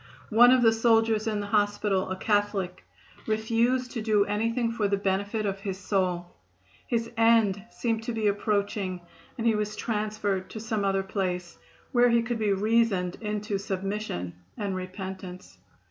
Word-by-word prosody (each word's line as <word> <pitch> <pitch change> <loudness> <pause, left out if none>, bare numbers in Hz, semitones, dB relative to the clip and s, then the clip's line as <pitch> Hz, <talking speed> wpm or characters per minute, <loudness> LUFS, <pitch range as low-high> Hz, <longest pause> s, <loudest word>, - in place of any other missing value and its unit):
One 240 +3 +7
of 255 -1 +5
the 225 -1 +6
soldiers 225 -1 +3
in 210 -2 0
the - - -4
hospital, 205 -2 +1
a 185 - -2
Catholic, 205 -2 0 0.4
refused 230 +3 +1
to 230 - -4
do 215 -2 +3
anything 230 +3 0
for 220 -3 0
the 200 0 +1
benefit 200 +2 -1
of 195 -1 -2
his 195 -2 -4
soul. 185 -3 0 0.6
His 230 -1 -1
end 225 -4 +4
seemed 225 -2 -2
to 240 - -2
be 225 -2 -2
approaching 200 -2 0 0.4
and 230 - -3
he 230 - +4
was 210 0 -2
transferred 210 -3 -2
to 220 - -7
some 220 -1 -2
other 195 -1 +1
place, 180 -3 -3 0.3
where 245 -2 +5
he 235 0 +3
could 235 0 -2
be 210 -2 +1
reasoned 200 -3 +1
into 210 -1 -2
submission 195 - -3 0.2
and 200 -2 -2
repentance. 185 0 -7
210 Hz, 160 wpm, -27 LUFS, 195-225 Hz, 0.6 s, One